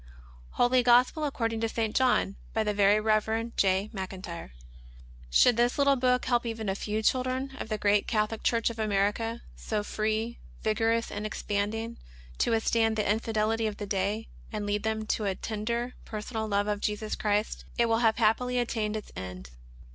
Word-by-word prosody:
Holy 250 +1 +4
Gospel 250 +5 +4
According 230 -5 -1
to 225 - 0
St. 220 -1 -2
John, 250 -6 +2 0.2
by 220 - +2
the 210 -1 0
Very 205 +1 +4
Rev. 220 +2 0
J. 195 +1 +2
Maclntyre. 185 - -6 0.8
Should 220 - +5
this 240 +1 +2
little 280 -1 +4
book 250 -1 +2
help 240 -1 +2
even 225 -3 -3
a - - +1
few 210 +2 -3
children 255 +3 0
of - - -5
the 215 - -1
great 205 0 +2
Catholic 215 0 0
Church 230 0 +1
of 230 - -10
America, 215 +2 0
so 215 -2 -2
free, 220 +2 -2 0.2
vigorous, 225 +1 +1
and 205 - -4
expanding, 215 +2 -2 0.4
to - - +2
withstand 225 0 +2
the 210 -1 0
infidelity 220 +1 +1
of 210 - -4
the 205 - -4
day, 200 +3 -1 0.2
and 210 -2 -3
lead 205 0 0
them 220 0 -2
to 215 0 -1
a 195 -1 0
tender, 235 +4 -3
personal 220 +1 -4
love 205 -1 +1
of 205 -1 -1
Jesus 215 0 -2
Christ, 210 0 -1
it 235 - +4
will 225 0 +2
have 225 -2 +3
happily 245 +3 +2
attained 220 -3 -1
its 215 - -9
end. 90 -8 -7
220 Hz, 175 wpm, -28 LUFS, 210-230 Hz, 0.8 s, Should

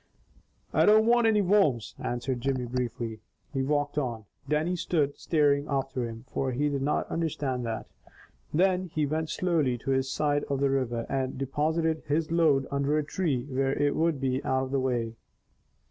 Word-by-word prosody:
"I - - +4
don't 215 +1 +6
want 235 0 +4
any 210 -2 +3
worms," 175 - +2
answered 120 +1 -2
Jimmy 130 -1 -1
briefly. 120 -2 -3 0.3
He 135 - 0
walked 145 +1 0
on. 115 -6 -3 0.2
Dannie 155 +4 +1
stood 160 -5 0
staring 145 -3 +2
after 135 -3 -1
him, 115 +2 -9
for 130 -1 -2
he 145 +4 +1
did 140 -1 -2
not 145 +2 0
understand 140 -7 -2
that. 110 -1 -3 0.7
Then 185 +3 +2
he 155 -3 -1
went 155 +2 -2
slowly 155 -10 +1
to 135 - -3
his 135 0 +1
side 145 0 +1
of 140 -1 -2
the 140 -1 +2
river, 120 -4 -1
and 130 -1 -2
deposited 155 +4 0
his 155 +2 0
load 155 -5 +3
under 140 +2 +1
a 155 - +1
tree 145 -5 -1
where 135 0 0
it 145 -1 +2
would 160 -3 +1
be 130 0 -1
out 130 0 +1
of 130 - -5
the 135 - +1
way. 120 -3 -1
140 Hz, 175 wpm, -28 LUFS, 130-155 Hz, 0.7 s, don't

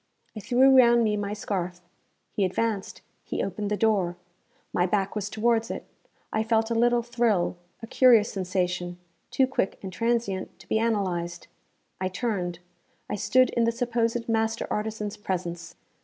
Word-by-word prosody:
I - - -5
threw 255 +5 +4
round 240 -2 +6
me 215 -1 +1
my 205 0 -2
scarf. 185 -4 -3 0.5
He 205 - 0
advanced; 200 +2 -2 0.2
he - - -3
opened 200 +2 -3
the 210 - 0
door. 195 -6 +1 0.6
My 180 +1 +2
back 195 +1 0
was 205 -1 -2
towards 225 +1 +1
it. - - -5 0.5
I 220 - +1
felt 225 0 +1
a - - +3
little 240 +1 +3
thrill, 230 -7 +1 0.3
a - - -2
curious 230 -2 +5
sensation, 180 -2 -2 0.3
too 265 - +3
quick 260 -7 -1
and 190 -1 -6
transient 230 -1 -1
to - - -17
be 220 - +1
analysed. 180 -6 -1 0.5
I 185 - 0
turned, 185 -3 -2 0.5
I - - 0
stood 255 +5 +3
in 235 - +2
the 230 - +2
supposed 235 -1 -1
master 225 0 0
artisan's 210 -1 -3
presence. 175 -4 -4
215 Hz, 155 wpm, -26 LUFS, 185-230 Hz, 0.6 s, round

